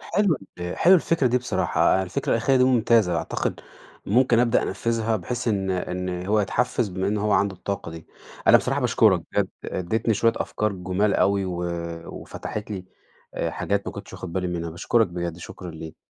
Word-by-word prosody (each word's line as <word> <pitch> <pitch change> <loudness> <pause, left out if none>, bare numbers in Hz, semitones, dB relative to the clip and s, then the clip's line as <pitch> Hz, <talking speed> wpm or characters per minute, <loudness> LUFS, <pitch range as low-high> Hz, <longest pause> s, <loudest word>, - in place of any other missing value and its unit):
حلوة 195 -8 +1 0.2
ال 90 0 -4
حلوة 185 +3 +7
الفكرة 165 -4 +1
دي 125 +1 +3
بصراحة، 125 - +1
يعني 95 - +3
الفكرة 95 0 -3
الأخيرة 120 +4 +3
دي 125 - +5
ممتازة، 115 -7 +3
أعتقد - - -2 0.5
ممكن 120 +2 +4
أبدأ 120 -1 +3
أنفذها، 115 +2 -1
بحيث 115 +6 -3
إن 95 -3 0
إن 90 0 -3
هو 105 +2 +3
يتحفز 105 +3 0
بما 95 +1 -2
إن 105 - 0
هو 105 0 +1
عنده 100 -1 +2
الطاقة 95 -1 -5
دي. 80 -1 -10 0.4
أنا - - +9
بصراحة - - 0
باشكرك - - +3
بجد، - - +1 0.2
اديتني 110 +5 -1
شوية 115 +3 +3
أفكار 105 -1 -1
جُمال 95 +2 0
أوي 100 0 +2
و 90 -1 -3 0.4
وفتحت 105 0 -7
لي 95 -3 -5 0.5
آآ - - -1
حاجات - - -2
ما - - -3
كنتش - - -9
واخد - - -7
بالي 90 +1 -1
منها. 85 -2 -3
باشكرك 110 +7 +2
بجد، 85 -1 -4
شكرًا 90 +1 -8
ليك. 80 -1 -9
100 Hz, 185 wpm, -24 LUFS, 90-115 Hz, 0.5 s, أنا